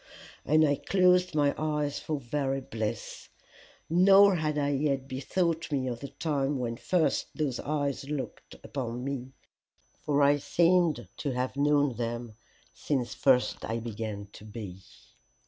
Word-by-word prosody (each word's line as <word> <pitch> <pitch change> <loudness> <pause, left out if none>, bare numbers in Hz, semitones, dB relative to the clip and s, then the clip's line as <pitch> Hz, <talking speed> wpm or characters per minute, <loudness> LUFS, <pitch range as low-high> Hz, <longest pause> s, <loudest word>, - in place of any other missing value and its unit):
And 155 +2 +4
I 145 -1 +1
closed 180 -2 +3
my 145 -2 +3
eyes 150 -2 -1
for 155 -2 -3
very 135 +1 -1
bliss; 110 -4 -5 0.6
nor 195 +3 +6
had 155 -2 -1
I 145 -1 +1
yet 135 -1 0
bethought 165 +5 -1
me 135 -3 0
of 120 -2 -3
the 140 - -6
time 140 0 -1
when 120 -2 -2
first 170 +6 +1
those 145 -6 -1
eyes 140 -2 -2
looked 135 -6 -5
upon 125 -3 -4
me, 130 -1 -4 0.7
for 145 -1 +1
I 145 +1 +5
seemed 170 +2 +2
to 140 -3 -2
have 125 +1 -2
known 145 -3 +2
them 120 -1 -4 0.4
since 130 -5 -2
first 130 -2 +2
I 115 - -2
began 110 -3 -5
to - - -12
be. 105 -4 -8
140 Hz, 145 wpm, -29 LUFS, 125-155 Hz, 0.7 s, nor